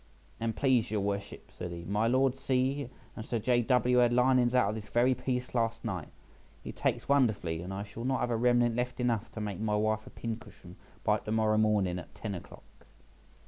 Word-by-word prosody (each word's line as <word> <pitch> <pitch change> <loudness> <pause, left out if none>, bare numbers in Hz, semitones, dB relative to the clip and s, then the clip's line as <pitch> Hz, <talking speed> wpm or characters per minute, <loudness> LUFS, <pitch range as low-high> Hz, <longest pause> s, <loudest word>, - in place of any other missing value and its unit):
"An 115 0 -1
please 130 -4 +2
your 105 -1 0
worships," 100 0 -4
said 90 - -6
he, 85 0 -7
"my 105 +4 +1
Lord 130 +1 +3
C— 135 +1 0 0.3
and 110 - -6
Sir 120 - -2
J. 120 +2 +2
W. 125 +1 +3
had 120 -1 +5
linings 125 0 +3
out 115 -6 +4
of 105 - -2
this 105 - -17
very 125 +2 +3
piece 125 0 -3
last 115 -1 -1
night; 90 -8 -3 0.6
it - - -6
takes - - -1
wonderfully, 110 -12 +2
and 90 +2 -6
I 95 +1 -4
shall 105 +3 -8
not 130 +1 0
have 120 - 0
a - - +2
remnant 120 0 +3
left 125 +1 -2
enough 115 -3 0
to - - -6
make 105 -3 -4
my 105 -1 0
wife 110 0 0
a - - -8
pin 115 -1 -4
cushion 90 -5 -14 0.3
by - - +2
to 105 - -6
morrow 110 -1 +2
morning 100 -5 +2
at 90 - -12
ten 105 -2 -5
o'clock." 90 - -12
115 Hz, 215 wpm, -30 LUFS, 105-125 Hz, 0.6 s, had